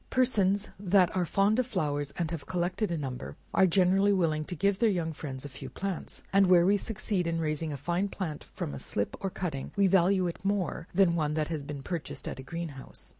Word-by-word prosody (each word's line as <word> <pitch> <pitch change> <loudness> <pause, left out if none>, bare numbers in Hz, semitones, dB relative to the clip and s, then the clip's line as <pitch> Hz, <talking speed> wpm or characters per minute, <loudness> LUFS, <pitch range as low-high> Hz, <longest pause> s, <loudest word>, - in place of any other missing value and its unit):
Persons 205 -6 +2
that 190 -2 +3
are 180 -1 +2
fond 200 +6 +2
of 255 - +1
flowers, 145 - -1
and 170 -2 -1
have 165 -4 -5
collected 185 +4 -1
a 170 - -1
number, 130 -4 -5 0.2
are 190 - +5
generally 190 +3 +4
willing 165 -5 +1
to 180 - -5
give 200 +3 +1
their 230 - +4
young 170 -5 -1
friends 135 -3 -6
a - - -3
few 135 -1 -9
plants; 195 -3 -4
and 195 -1 +6
where 175 -1 +6
we 200 +2 +5
succeed 205 -4 -1
in 165 0 0
raising 155 0 -1
a 145 - -4
fine 175 +7 0
plant 180 -6 -5
from 70 - -6
a 70 - -5
slip, 100 - -2
or 195 - 0
cutting, 160 -8 -4
we 200 -1 +4
value 190 0 +4
it 175 +1 -4
more 195 -4 -1
than 185 -2 +4
one 150 -2 0
that 155 0 0
has 160 -3 -2
been 140 -1 -7
purchased 170 0 -5
at - - -5
a - - -7
green 170 +3 -4
house. 135 -2 -9
175 Hz, 225 wpm, -29 LUFS, 155-195 Hz, 0.2 s, and